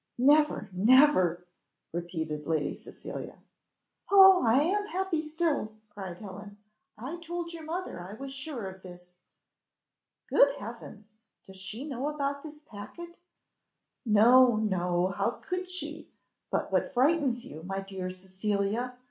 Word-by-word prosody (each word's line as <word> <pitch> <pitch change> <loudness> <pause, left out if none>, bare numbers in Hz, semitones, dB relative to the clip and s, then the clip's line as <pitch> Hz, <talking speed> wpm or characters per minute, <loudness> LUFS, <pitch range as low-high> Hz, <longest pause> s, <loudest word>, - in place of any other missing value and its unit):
"Never, 295 +4 +4
never," 185 - +4 0.5
repeated 160 -3 -4
Lady 155 -3 0
Cecilia. - - -9 0.7
"Oh, 385 -2 +8
I 245 +5 +4
am 410 +5 0
happy 380 -5 -1
still," 310 -8 -1 0.2
cried 190 -4 -7
Helen. 205 0 -10 0.4
"I 265 +10 -6
told 340 0 -5
your 330 - -8
mother 345 - -4
I 180 +3 -8
was 270 +4 -7
sure 275 -6 -5
of 190 0 -10
this." 180 -1 -13 1.2
"Good 280 0 +4
heavens! 225 -3 -9 0.4
Does 190 0 -12
she 215 +9 -6
know 275 0 -3
about 280 -1 -2
this 300 0 -11
packet?" 335 +12 -10 0.9
"No, 240 +2 +6
no! 180 -4 0
how 200 +5 -2
could 365 -1 -3
she? 365 0 -4 0.4
But - - -1
what - - +1
frightens 265 -2 +2
you, 155 +2 -9
my 195 +3 -4
dear 190 -1 -5
Cecilia? 200 +6 -2
235 Hz, 130 wpm, -29 LUFS, 190-300 Hz, 1.2 s, Oh